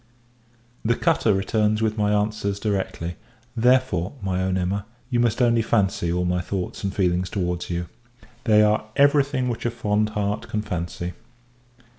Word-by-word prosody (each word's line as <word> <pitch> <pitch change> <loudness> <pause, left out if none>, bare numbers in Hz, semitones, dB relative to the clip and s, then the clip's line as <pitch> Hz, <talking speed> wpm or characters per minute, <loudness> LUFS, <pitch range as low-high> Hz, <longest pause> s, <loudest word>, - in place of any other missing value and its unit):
The 115 +1 +2
cutter 110 - +2
returns 105 +2 +1
with 110 -1 +1
my 105 -1 +1
answers 105 -1 0
directly; 95 -5 -2 0.4
therefore, 125 -7 +2
my 95 -2 -1
own 95 0 0
Emma, 95 +3 -2 0.2
you 120 - +2
must 120 +1 +2
only 115 -1 +4
fancy 100 -6 +1
all 90 +1 0
my 90 0 0
thoughts 95 +1 -4
and 100 - 0
feelings 90 -1 0
towards 90 -3 -2
you. 85 0 -2 0.6
They 105 -2 +6
are 105 0 +2
every 140 0 +5
thing 135 -2 -2
which 120 -2 -3
a 120 - +1
fond 105 -2 0
heart 105 +3 -1
can 105 -1 -2
fancy. 85 -1 -4
105 Hz, 160 wpm, -24 LUFS, 90-110 Hz, 0.6 s, They